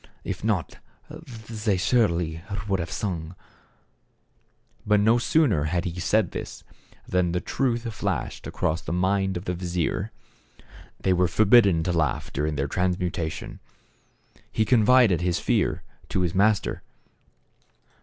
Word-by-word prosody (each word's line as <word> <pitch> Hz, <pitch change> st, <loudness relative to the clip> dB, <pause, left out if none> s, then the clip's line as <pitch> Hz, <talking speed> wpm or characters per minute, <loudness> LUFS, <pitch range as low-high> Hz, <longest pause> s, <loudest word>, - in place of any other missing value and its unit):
If -, -, -5 dB
not 105 Hz, -6 st, -1 dB, 0.7 s
they 105 Hz, -3 st, -1 dB
surely 90 Hz, -5 st, +1 dB, 0.3 s
would 95 Hz, -2 st, 0 dB
have 85 Hz, -, -3 dB
sung! 85 Hz, -4 st, -4 dB, 0.7 s
" -, -, -31 dB
But 105 Hz, 0 st, +4 dB
no 110 Hz, +3 st, +4 dB
sooner 120 Hz, -, +2 dB
had 85 Hz, +2 st, -1 dB
he 90 Hz, 0 st, -4 dB
said 100 Hz, +1 st, +1 dB
this -, -, -7 dB, 0.4 s
than 90 Hz, -2 st, +1 dB
the 90 Hz, -, +1 dB
truth 120 Hz, +3 st, -1 dB
flashed -, -, -3 dB
across 80 Hz, +1 st, -1 dB
the -, -, -4 dB
mind 95 Hz, +1 st, +1 dB
of 90 Hz, -, -7 dB
the 90 Hz, -, -1 dB
vizier. 90 Hz, +3 st, -2 dB, 0.9 s
They 95 Hz, -, +2 dB
were 90 Hz, 0 st, +3 dB
forbidden 100 Hz, -5 st, +5 dB
to 90 Hz, -, -1 dB
laugh 80 Hz, -3 st, -1 dB
during 75 Hz, +2 st, -1 dB
their 70 Hz, 0 st, -1 dB
transmuta 90 Hz, -2 st, -1 dB
tion. -, -, -8 dB, 0.9 s
He 110 Hz, -, +1 dB
confided 110 Hz, -5 st, +4 dB
his 90 Hz, -1 st, +1 dB
fear -, -, 0 dB, 0.3 s
to 95 Hz, -, 0 dB
his 90 Hz, -2 st, 0 dB
master. 105 Hz, +2 st, +2 dB
90 Hz, 135 wpm, -25 LUFS, 85-105 Hz, 0.9 s, forbidden